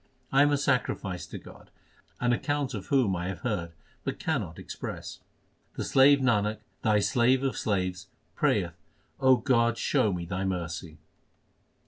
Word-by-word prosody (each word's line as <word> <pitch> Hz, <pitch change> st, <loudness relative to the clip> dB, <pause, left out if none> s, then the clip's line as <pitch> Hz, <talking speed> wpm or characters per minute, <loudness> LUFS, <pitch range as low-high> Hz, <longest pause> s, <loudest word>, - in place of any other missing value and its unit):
1 135 Hz, -, +5 dB
am 145 Hz, 0 st, +5 dB
a 145 Hz, -, +3 dB
sacrifice 120 Hz, -9 st, -1 dB
to -, -, -7 dB
God, -, -, -14 dB, 0.5 s
an 120 Hz, 0 st, +2 dB
account 145 Hz, +1 st, -1 dB
of 100 Hz, -4 st, -6 dB
whom 125 Hz, -9 st, +2 dB
I 90 Hz, +1 st, -3 dB
have 95 Hz, -2 st, -5 dB
heard, 90 Hz, -8 st, -2 dB, 0.3 s
but -, -, -3 dB
cannot -, -, -2 dB
express. -, -, -7 dB, 0.6 s
The -, -, -3 dB
slave 140 Hz, +1 st, +6 dB
Nanak, 110 Hz, -4 st, +2 dB, 0.2 s
Thy 110 Hz, -1 st, +3 dB
slave 120 Hz, +6 st, +3 dB
of 135 Hz, -, 0 dB
slaves, 95 Hz, -2 st, -2 dB, 0.3 s
prayeth -, -, +1 dB, 0.5 s
O 130 Hz, -1 st, +6 dB
God, 120 Hz, -2 st, +2 dB
show 105 Hz, -, +2 dB
me 90 Hz, -2 st, -3 dB
Thy 95 Hz, +2 st, -3 dB
mercy 85 Hz, -3 st, -4 dB
110 Hz, 150 wpm, -28 LUFS, 95-130 Hz, 0.6 s, slave